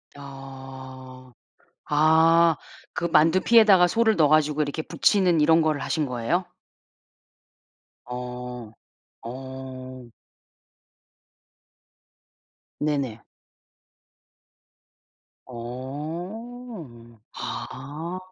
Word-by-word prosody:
아. 130 Hz, -2 st, -11 dB, 0.6 s
아. 160 Hz, +2 st, +5 dB, 0.4 s
그 -, -, -2 dB
만두피에다가 185 Hz, +4 st, +5 dB
소를 225 Hz, +3 st, +2 dB
넣어 155 Hz, -3 st, +4 dB
가지고 150 Hz, 0 st, +3 dB
이렇게 150 Hz, +2 st, -3 dB
부치는 180 Hz, -2 st, +2 dB
이런 160 Hz, +2 st, +5 dB
거를 155 Hz, -3 st, 0 dB
하신 155 Hz, -3 st, -1 dB
거예요? 125 Hz, +9 st, -1 dB, 1.6 s
어. 125 Hz, -2 st, -7 dB, 0.5 s
어. 130 Hz, 0 st, -8 dB, 2.7 s
네네. 140 Hz, -7 st, -1 dB, 2.3 s
어. 145 Hz, -, -8 dB
아. 155 Hz, +7 st, -6 dB
145 Hz, 120 characters per minute, -25 LUFS, 130-165 Hz, 2.7 s, 아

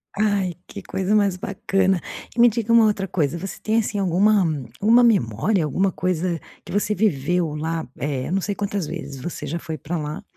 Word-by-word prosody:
Ai 200 Hz, -4 st, +1 dB
que -, -, -9 dB
coisa 190 Hz, +2 st, 0 dB
mais 200 Hz, -3 st, +2 dB
bacana 190 Hz, -1 st, 0 dB, 0.4 s
e -, -, -4 dB
me 240 Hz, -, +8 dB
diga 230 Hz, 0 st, 0 dB
uma 230 Hz, -1 st, +7 dB
outra 205 Hz, -2 st, 0 dB
coisa 160 Hz, -4 st, 0 dB
você 190 Hz, +3 st, -6 dB
tem 220 Hz, +1 st, 0 dB
assim 210 Hz, -1 st, -2 dB
alguma 195 Hz, +2 st, +3 dB, 0.3 s
uma 235 Hz, +4 st, +5 dB
memória 185 Hz, -, +2 dB
alguma 190 Hz, +6 st, +1 dB
coisa 175 Hz, +1 st, -1 dB, 0.2 s
que -, -, -10 dB
você 205 Hz, +1 st, +1 dB
viveu 175 Hz, -4 st, 0 dB
lá 160 Hz, 0 st, -3 dB
é 135 Hz, -1 st, -2 dB
não 190 Hz, -, +1 dB
sei 205 Hz, +2 st, -2 dB
quantas 200 Hz, -3 st, -2 dB
vezes 145 Hz, -4 st, -6 dB
você 175 Hz, +7 st, -6 dB
já 165 Hz, -, -2 dB
foi 160 Hz, -1 st, -5 dB
pra 165 Hz, +5 st, -4 dB
lá. 155 Hz, +6 st, -5 dB
185 Hz, 190 wpm, -22 LUFS, 160-205 Hz, 0.4 s, me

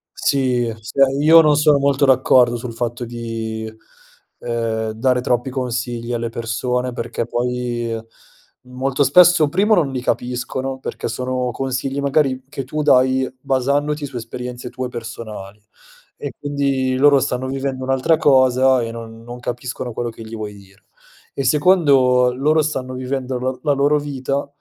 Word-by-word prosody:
Sì, 125 Hz, -4 st, +1 dB
cioè 115 Hz, +5 st, +1 dB, 0.2 s
io 160 Hz, +2 st, +8 dB
non 150 Hz, -2 st, +4 dB
sono 150 Hz, -1 st, +4 dB
molto 140 Hz, 0 st, +2 dB
d'accordo 130 Hz, -2 st, +4 dB
sul 120 Hz, 0 st, -6 dB
fatto 120 Hz, +1 st, -3 dB
di, 115 Hz, -2 st, -5 dB, 0.7 s
ehm, 115 Hz, -2 st, -2 dB
dare 125 Hz, +3 st, +1 dB
troppi 125 Hz, 0 st, 0 dB
consigli 120 Hz, -2 st, -3 dB
alle 115 Hz, 0 st, -2 dB
persone 125 Hz, +2 st, -2 dB
perché 115 Hz, -1 st, -3 dB
poi 120 Hz, -1 st, -2 dB, 0.7 s
molto 130 Hz, +2 st, -1 dB
spesso, 160 Hz, +2 st, +5 dB
primo 200 Hz, +7 st, +2 dB
non 155 Hz, -7 st, +1 dB
li 130 Hz, -1 st, -3 dB
capiscono, 125 Hz, +2 st, -3 dB
perché -, -, -5 dB
sono 125 Hz, +1 st, -2 dB
consigli 135 Hz, +2 st, -3 dB
magari 140 Hz, -2 st, +1 dB
che 135 Hz, 0 st, -5 dB
tu 150 Hz, +4 st, -3 dB
dai 130 Hz, -2 st, +3 dB
basandoti 145 Hz, +2 st, 0 dB
su 135 Hz, -2 st, -10 dB
esperienze 125 Hz, +1 st, -6 dB
tue 130 Hz, 0 st, -4 dB
personali 110 Hz, -4 st, -8 dB, 0.6 s
e -, -, -6 dB
quindi 140 Hz, -2 st, -1 dB
loro 140 Hz, +1 st, +5 dB
stanno 130 Hz, 0 st, -2 dB
vivendo 135 Hz, 0 st, -3 dB
un'altra 135 Hz, +4 st, +2 dB
cosa 130 Hz, -3 st, +4 dB
e 115 Hz, -1 st, -3 dB
non 115 Hz, 0 st, -9 dB
non 120 Hz, +1 st, -9 dB
capiscono 120 Hz, 0 st, -5 dB
quello 120 Hz, +1 st, -3 dB
che 115 Hz, -, -13 dB
gli 110 Hz, +1 st, -8 dB
vuoi 105 Hz, -2 st, -6 dB
dire. 100 Hz, -1 st, -18 dB, 0.5 s
E 140 Hz, -, -3 dB
secondo, 135 Hz, -5 st, +4 dB
loro 155 Hz, +4 st, +2 dB
stanno 130 Hz, -4 st, -3 dB
vivendo 130 Hz, 0 st, -3 dB
l 130 Hz, 0 st, -3 dB
la 145 Hz, -, +2 dB
loro 140 Hz, +2 st, +2 dB
vita 140 Hz, -1 st, -3 dB
130 Hz, 150 wpm, -19 LUFS, 120-140 Hz, 0.7 s, io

